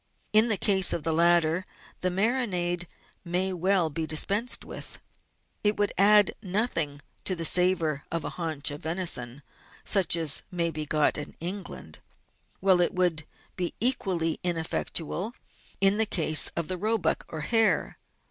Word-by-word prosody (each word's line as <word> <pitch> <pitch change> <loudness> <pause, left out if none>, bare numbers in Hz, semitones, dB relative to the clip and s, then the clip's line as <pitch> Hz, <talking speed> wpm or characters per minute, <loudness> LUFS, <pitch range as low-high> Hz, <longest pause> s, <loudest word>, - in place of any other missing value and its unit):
In 215 +2 +5
the 215 -3 +2
case 190 -2 +4
of 160 - -3
the 160 +1 0
latter, 170 +1 +2 0.4
the 185 - 0
marinade 180 -4 -1 0.4
may 185 +2 -2
well 180 -2 +1
be 160 +1 -4
dispensed 200 +10 0
with. - - -7 0.7
It 210 0 +1
would 205 0 0
add 205 +1 +5
nothing 180 - -2 0.2
to 185 - 0
the 165 -1 -3
savour 170 -5 +3
of 165 -1 -3
a - - -4
haunch 155 -4 -2
of 145 - -8
venison, 150 -6 -1 0.4
such 190 -4 +3
as 160 -4 +1
may 170 -3 -1
be 155 -1 -6
got 150 0 +1
in 145 - -7
England, 175 - -7 0.6
while 190 -2 +4
it 175 - 0
would 170 -4 0 0.3
be 180 -2 -3
equally 190 -10 +2
ineffectual 175 +4 -1 0.4
in 195 +2 +3
the 220 - +4
case 160 -6 +3
of 170 -2 -3
the 185 -1 -4
roebuck 220 +3 0
or 160 - -7
hare. 220 -1 +1
175 Hz, 150 wpm, -27 LUFS, 160-195 Hz, 0.7 s, In